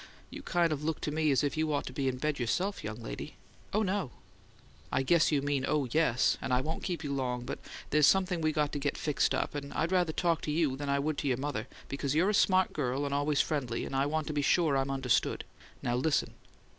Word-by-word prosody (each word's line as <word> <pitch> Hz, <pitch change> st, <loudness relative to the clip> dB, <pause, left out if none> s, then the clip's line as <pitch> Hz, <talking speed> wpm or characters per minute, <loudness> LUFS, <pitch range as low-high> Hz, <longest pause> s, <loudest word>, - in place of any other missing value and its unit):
You -, -, -7 dB
kind 170 Hz, -3 st, +1 dB
of 150 Hz, 0 st, -5 dB
look 160 Hz, 0 st, -1 dB
to 150 Hz, -, -2 dB
me 155 Hz, 0 st, +1 dB
as 135 Hz, -2 st, +3 dB
if 145 Hz, -, 0 dB
you 155 Hz, 0 st, 0 dB
ought 145 Hz, -, 0 dB
to -, -, -7 dB
be 135 Hz, -2 st, -1 dB
in 130 Hz, -1 st, -1 dB
bed 150 Hz, +1 st, -1 dB
yourself, 180 Hz, -, -1 dB
young 110 Hz, +2 st, -6 dB
lady." -, -, -6 dB, 0.4 s
"Oh, 215 Hz, +2 st, +2 dB
no." 195 Hz, -6 st, -1 dB, 0.8 s
"I -, -, +1 dB
guess 165 Hz, +4 st, +4 dB
you 140 Hz, -2 st, +1 dB
mean 140 Hz, -2 st, 0 dB
'Oh, 150 Hz, -3 st, +1 dB
yes'; 150 Hz, -5 st, +2 dB
and -, -, -3 dB
I 125 Hz, -, +4 dB
won't 155 Hz, +5 st, -3 dB
keep 175 Hz, -3 st, -3 dB
you 140 Hz, -1 st, -2 dB
long, 125 Hz, -2 st, -2 dB
but -, -, -5 dB, 0.3 s
there's 150 Hz, 0 st, +5 dB
something 185 Hz, -3 st, +3 dB
we 155 Hz, 0 st, +2 dB
got 150 Hz, -1 st, 0 dB
to 145 Hz, -, -3 dB
get 140 Hz, 0 st, -1 dB
fixed 150 Hz, -2 st, +1 dB
up, -, -, -1 dB
and 140 Hz, -1 st, -5 dB
I'd 165 Hz, +3 st, 0 dB
rather 180 Hz, -3 st, +2 dB
talk 170 Hz, 0 st, +1 dB
to 150 Hz, -, -3 dB
you 150 Hz, -4 st, +1 dB
than 140 Hz, +1 st, -4 dB
I 140 Hz, -, +2 dB
would 145 Hz, +1 st, -1 dB
to 145 Hz, -, -2 dB
your 125 Hz, -3 st, +1 dB
mother, 145 Hz, +2 st, -3 dB, 0.2 s
because 140 Hz, +1 st, -2 dB
you're 180 Hz, +6 st, +3 dB
a -, -, -2 dB
smart 185 Hz, -2 st, +3 dB
girl 140 Hz, 0 st, -1 dB
and 140 Hz, -, -2 dB
always 145 Hz, 0 st, +2 dB
friendly; 130 Hz, -7 st, -2 dB
and -, -, -5 dB
I 135 Hz, +1 st, +2 dB
want 155 Hz, +1 st, -1 dB
to 155 Hz, -, -4 dB
be 145 Hz, -, +1 dB
sure 155 Hz, 0 st, +3 dB
I'm 135 Hz, 0 st, 0 dB
understood. 135 Hz, -3 st, +1 dB, 0.4 s
Now, 120 Hz, -, 0 dB
listen." 145 Hz, +3 st, +1 dB
145 Hz, 250 wpm, -31 LUFS, 135-160 Hz, 0.8 s, there's